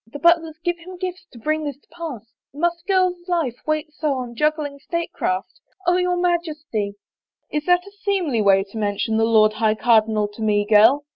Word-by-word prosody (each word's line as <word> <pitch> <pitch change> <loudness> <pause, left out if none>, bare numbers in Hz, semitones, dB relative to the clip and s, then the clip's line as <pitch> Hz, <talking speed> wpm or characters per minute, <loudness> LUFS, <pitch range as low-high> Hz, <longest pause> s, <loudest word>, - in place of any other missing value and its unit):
The 225 - -8
Butlers 325 0 +3
give 350 -1 0
him 365 +2 -10
gifts 365 0 -5
to 245 - -14
bring 310 +6 -1
this 285 -3 -4
to - - -35
pass 300 -10 -8
— - - -71
must 340 +2 0
a - - -43
girl's 365 -2 +1
life 325 -9 0
wait 310 0 -1
so 300 -1 -1
on 250 -2 -5
juggling 300 +1 -1
state 335 +4 -3
craft? 185 +2 -2 0.3
Oh, 355 0 +3
your 360 0 +1
Majesty 310 - -1
— - - -71
" - - -71
" - - -49
Is 300 0 -2
that 355 0 +3
a 400 - -12
seemly 385 - -1
way 195 -1 +4
to 205 +3 -8
mention 210 +2 0
the 225 - +3
Lord 215 -1 +4
High 215 0 +1
Cardinal 220 -2 +3
to 205 +2 -12
me, 205 -1 +2
girl 225 +7 +5
295 Hz, 220 wpm, -22 LUFS, 220-345 Hz, 0.3 s, girl